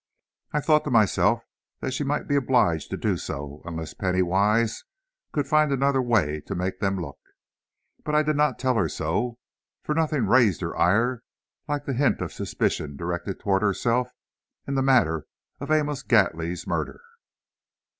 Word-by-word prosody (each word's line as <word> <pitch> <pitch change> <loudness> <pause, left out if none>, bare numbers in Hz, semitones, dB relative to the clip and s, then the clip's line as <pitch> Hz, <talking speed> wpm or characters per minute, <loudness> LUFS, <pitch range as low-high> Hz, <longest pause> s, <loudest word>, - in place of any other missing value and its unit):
I 150 - 0
thought 155 +1 +3
to - - -2
myself 110 -1 +3 0.4
that 130 - -3
she 140 - -1
might 145 +1 -1
be 145 - +1
obliged 120 - +2
to - - -3
do - - 0
so, 70 +1 -6
unless 80 -3 -5
Penny 95 -1 0
Wise 105 +5 +1 0.5
could 145 -2 -1
find 155 0 +3
another 135 0 +2
way 95 -12 +1
to - - -3
make 95 +1 -3
them 95 -1 0
look. 70 -5 -7 0.8
But 150 - -1
I 150 - +4
did 155 0 0
not 150 +1 +2
tell 130 -1 +1
her 90 -7 +1
so, 105 +12 -2 0.5
for 150 - -1
nothing 155 -3 +1
raised 110 - +4
her - - -3
ire 115 +7 +2 0.5
like 145 -1 -2
the 135 - -2
hint 135 +2 +2
of - - -4
suspicion 70 -2 -2
directed 85 +3 -4
toward 95 -1 +1
herself 115 +4 +1 0.6
in 140 - -2
the 135 - +1
matter 80 - +2 0.3
of 140 - -6
Amos 150 -3 +1
Gately's 90 -8 +1
murder. - - -3
115 Hz, 165 wpm, -25 LUFS, 90-140 Hz, 0.8 s, I